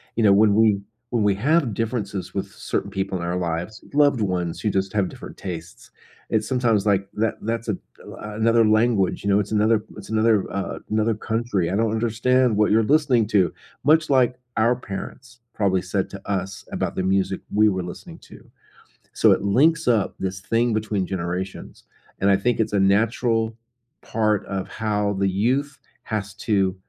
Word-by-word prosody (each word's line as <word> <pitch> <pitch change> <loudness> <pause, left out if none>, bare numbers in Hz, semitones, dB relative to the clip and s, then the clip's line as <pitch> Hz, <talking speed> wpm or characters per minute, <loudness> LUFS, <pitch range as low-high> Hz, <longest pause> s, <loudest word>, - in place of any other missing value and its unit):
You 115 - +1
know, 100 -2 +6
when 105 0 +5
we 110 -3 +4 0.3
when 120 -3 0
we 100 -1 +3
have 140 +1 +1
differences 110 -4 -3
with - - -4
certain 100 - -3
people 95 -1 -2
in 85 - -5
our 85 +1 -2
lives, 85 +4 -3
loved 145 -3 +4
ones 90 -4 -1
who 110 - 0
just 95 -1 -1
have 100 -3 +1
different - - -11
tastes, 85 -3 -8 0.4
it's 110 -1 0
sometimes 120 -6 +1
like 100 -1 +2
that 110 0 0
that's 115 +1 -3
a 100 - 0 0.3
l - - -10 0.2
another 115 +1 +3
language, 110 -3 +2
you 100 - -1
know, 100 +1 +4
it's 105 +1 -3
another 110 0 +2
it's 100 - -10
another, 110 -2 +3
uh, 100 -1 -4
another 110 +1 +1
country. 110 -5 -1
"I - - 0
don't 110 +1 +1
understand 120 +2 +2
what 105 0 +3
you're 110 +1 +4
listening 135 -5 +3
to," 95 -6 +2 0.3
much 155 +2 +4
like 130 -2 +3 0.2
our 115 +3 +3
parents 120 +3 -8
probably 95 -3 +1
said 95 +1 -2
to 100 0 -10
us 95 -1 -3
about - - -2
the 95 - -1
music 95 0 0
we 105 +1 +5
were 95 -2 -2
listening 90 - -9
to. - - -16 0.6
So - - +4
it - - +3
links 155 +11 +3
up 115 -5 +2
this 95 -1 -3
thing 115 +4 +1
between 105 -3 -1
generations, 90 +1 -5 0.3
and 100 - +2
I 100 - +5
think 120 +2 0
it's 110 - 0
a 100 - +3
natural 110 +3 +2 0.5
part 110 -2 0
of 95 -1 -4
how 105 -2 -1
the 100 0 0
youth 130 +9 0 0.2
has 100 -3 -4
to, 100 -4 0
105 Hz, 185 wpm, -23 LUFS, 95-115 Hz, 0.6 s, know